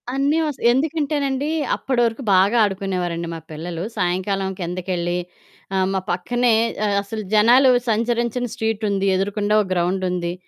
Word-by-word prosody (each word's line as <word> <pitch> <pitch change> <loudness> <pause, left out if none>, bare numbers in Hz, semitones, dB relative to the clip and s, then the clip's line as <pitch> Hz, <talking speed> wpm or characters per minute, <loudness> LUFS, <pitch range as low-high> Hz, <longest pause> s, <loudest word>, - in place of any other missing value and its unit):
అన్నీ 285 +3 +2
వస్ 295 -3 -3
ఎందుకంటేనండి 285 0 0 0.3
అప్పటి 255 -3 -1
వరకు 230 +3 -3
బాగా 195 +5 +4
ఆడుకునేవారండి 185 -4 -2
మా 165 - -6
పిల్లలు 165 +2 -5
సాయంకాలం 190 +2 -1
కిందకెళ్ళి, 175 0 -2 0.6
ఆహ్, 190 0 +2
మా 190 - +1
పక్కనే 240 +7 +1 0.5
అసలు 215 +2 -6
జనాలు 240 +5 +6 0.2
సంచరించని 235 +2 0
స్ట్రీటుంది, 210 -3 -1
ఎదురుగుండా 205 +2 -1
ఓ - - 0
గ్రౌండుంది 180 -1 -1
205 Hz, 120 wpm, -21 LUFS, 180-245 Hz, 0.6 s, జనాలు